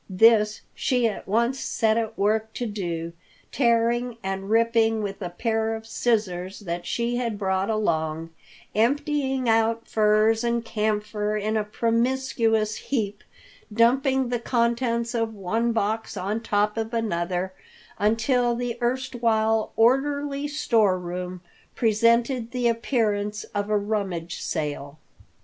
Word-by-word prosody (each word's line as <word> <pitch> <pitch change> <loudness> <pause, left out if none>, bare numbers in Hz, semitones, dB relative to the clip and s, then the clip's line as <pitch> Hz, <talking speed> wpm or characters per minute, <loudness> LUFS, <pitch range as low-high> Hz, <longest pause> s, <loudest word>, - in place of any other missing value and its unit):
This 215 +2 +4
she 250 -2 +1
at 215 - -5
once 235 +6 +1
set 220 -4 +1
at 225 -1 -2
work 220 +2 +1
to 245 - -2
do, 170 -6 -4 0.4
tearing 235 -1 +1
and 195 +1 -3
ripping 225 -1 +3
with 200 0 -5
a 180 - -3
pair 225 +4 -1
of 220 0 -8
scissors 205 -5 -1
that 175 -3 -4
she 240 +1 -1
had 235 -4 -2
brought 190 0 0
along, 165 -6 -1 0.4
emptying 270 +2 +1
out 225 0 +2
furs 215 +1 +3
and 235 -1 0
camphor 210 -1 -1
in 215 +1 -1
a 215 - +1
promiscuous 230 -1 0
heap, 210 -6 -3 0.5
dumping 260 +3 +3
the 245 -1 -1
contents 235 0 0
of 225 -2 -1
one 220 +5 0
box 220 0 -1
on 200 +4 -2
top 210 -1 0
of 225 +1 -2
another 185 -4 -1 0.5
until 235 +3 +2
the 240 0 -3
erstwhile 230 -3 +1
orderly 280 +4 +2
store 225 -10 +2
room 180 0 -5 0.3
presented 230 +2 +2
the 250 -1 0
appearance 215 -3 0
of 205 0 -2
a 210 - +3
rummage 200 -5 -3
sale. 145 -2 -4
225 Hz, 125 wpm, -25 LUFS, 205-235 Hz, 0.5 s, This